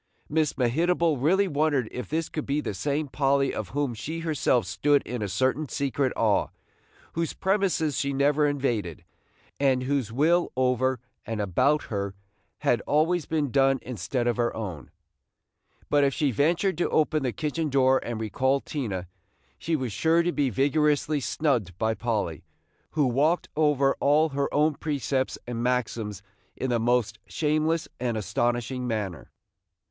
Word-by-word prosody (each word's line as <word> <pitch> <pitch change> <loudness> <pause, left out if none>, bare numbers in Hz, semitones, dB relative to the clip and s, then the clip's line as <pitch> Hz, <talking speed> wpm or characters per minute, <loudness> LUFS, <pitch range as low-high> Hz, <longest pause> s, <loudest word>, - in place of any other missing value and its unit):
Miss 155 -1 +1
Mehitable 160 +4 +2
really 190 +7 +3
wondered 145 -6 +1
if 125 - -6
this 160 +1 -1
could 155 - -5
be 140 +2 +1
the 145 - -3
same 145 +8 -1
Polly 135 0 +1
of 105 -4 -4
whom 140 0 -1
she 160 +9 -5
herself 150 - +1
stood 145 +10 +2
in 120 -1 -4
a 105 - -1
certain 130 +7 0
secret 140 -1 0
awe, 110 -3 +2 0.7
whose 165 0 -2
premises 190 -7 0
she 140 - 0
never 145 +2 +2
invaded, 120 - -2 0.6
and 130 -2 +2
whose 130 -4 -1
will 165 +8 +2
over 130 0 +1 0.2
and 115 -1 -4
about 130 - +2
her 100 -3 -4 0.5
had - - +2
been - - -10
always 160 +3 +2
done 135 -3 +2
instead 120 +1 -3
of 120 -2 +1
her 120 -1 +1
own; 90 - -6 1.0
but 145 -1 +3
if 140 -1 +2
she 145 -3 +1
ventured 170 - +1
to - - +1
open 155 0 +2
the 130 -2 0
kitchen 155 +2 -2
door 130 -1 +4
and 120 -2 -4
recall 130 +6 +1
Tina, 105 - -4 0.5
she 165 - -1
was 130 -6 -2
sure 165 - +3
to 175 - +1
be 145 -5 +1
vigorously 145 +4 +1
snubbed 125 - -1
by 110 +1 +1
Polly, 105 -9 -2 0.5
who 150 -2 +2
walked 145 +8 +1
over 145 -3 +3
all 150 +3 +3
her 140 0 -1
own 150 +1 +3
precepts 140 -3 -2
and 120 -1 -4
maxims 115 -5 -2 0.3
in 130 - -2
the 120 - +2
most 115 -2 +1
shameless 155 - 0
and 120 -2 -1
astonishing 120 +5 -1
manner. 100 - -3
135 Hz, 155 wpm, -26 LUFS, 120-150 Hz, 1.0 s, door